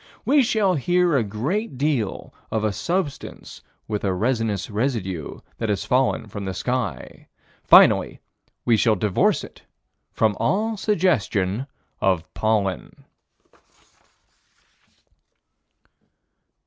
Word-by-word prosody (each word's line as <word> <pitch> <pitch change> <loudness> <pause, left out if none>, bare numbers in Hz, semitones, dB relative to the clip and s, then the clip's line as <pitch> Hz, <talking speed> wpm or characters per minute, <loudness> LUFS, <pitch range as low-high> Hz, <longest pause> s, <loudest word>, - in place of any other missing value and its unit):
We 285 +1 +4
shall 220 -6 +2
hear 175 +2 +2
a 130 - +3
great 130 - -3
deal 135 -8 -2 0.2
of 110 -1 -1
a 105 -2 0
substance 170 - -4 0.3
with 105 -2 -3
a 95 -2 0
resinous 110 -2 -1
residue 105 - -3 0.2
that 115 - -2
has 100 -2 -1
fallen 130 -1 +1
from 105 -1 -7
the 95 -1 -4
sky: 125 +1 -4 0.4
finally - - +6 0.5
we 115 -2 +4
shall 110 0 +3
divorce 100 0 +1
it - - -12 0.5
from 110 -2 +1
all 210 - 0
suggestion 135 - 0 0.3
of 95 -4 +1
pollen. 105 -5 -2
115 Hz, 105 wpm, -23 LUFS, 100-155 Hz, 0.5 s, finally